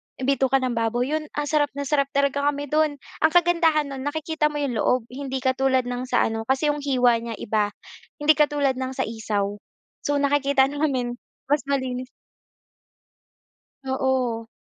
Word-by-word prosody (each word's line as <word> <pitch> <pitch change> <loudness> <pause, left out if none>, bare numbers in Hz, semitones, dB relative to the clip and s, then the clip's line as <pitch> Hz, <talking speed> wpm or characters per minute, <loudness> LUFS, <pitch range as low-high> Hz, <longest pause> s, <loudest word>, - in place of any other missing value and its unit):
bituka 270 0 +1
ng 255 - 0
baboy 235 +3 0
yun 310 0 -1
ang 295 - 0
sarap 295 -1 +3
na 285 - -3
sarap 280 -1 +1
talaga 280 0 +2
kami 290 -1 -2
do'n. 305 -1 +2 0.2
Ang 315 - +4
kagandahan 325 -4 +3
no'n 270 +1 -5
nakikita 315 0 0
mo 300 - -6
yung 270 -7 -1
loob 250 -2 +2
hindi 265 0 -4
katulad 260 0 +2
ng 245 +1 -4
sa - - +2
ano, 225 0 -2
kasi 270 +3 +2
yung 295 - -4
hiwa 250 -4 +3
niya 230 -1 -5
iba, 210 0 0 0.5
hindi 295 0 +4
katulad 290 -3 +2
ng 260 0 -3
sa - - 0
isaw. 205 -2 -2 0.4
So 290 -1 -1
nakikita 280 -1 +3
namin 260 -5 -1 0.3
mas 295 - +3
malinis 255 -2 -2 1.8
Oo. 260 -4 -1
270 Hz, 160 wpm, -24 LUFS, 250-290 Hz, 1.8 s, Ang